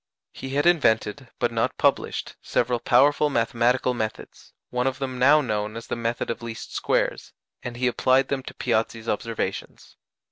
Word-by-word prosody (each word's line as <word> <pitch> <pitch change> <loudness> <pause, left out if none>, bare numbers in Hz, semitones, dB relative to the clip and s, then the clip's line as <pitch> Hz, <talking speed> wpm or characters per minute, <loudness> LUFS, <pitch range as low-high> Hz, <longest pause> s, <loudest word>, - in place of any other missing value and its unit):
He 135 +1 -7
had 145 - +2
invented 115 -12 +2
but - - 0
not - - -1
published - - 0
several 120 0 0
powerful 145 +4 +4
mathematical 120 0 +1
methods 110 -3 -6 0.2
(one 125 +1 0
of 135 0 -1
them 130 -2 -4
now 145 +4 +6
known 105 -3 -2
as 115 - -7
"the - - -3
method 115 0 -2
of 115 - -6
least 115 -1 -7
squares"), - - -1 0.3
and 120 -1 -6
he 125 - -1
applied 130 +2 +2
them 140 -1 -1
to - - -10
Piazzi's 115 -1 -1
observations. 115 +1 -4
125 Hz, 165 wpm, -24 LUFS, 115-135 Hz, 0.3 s, now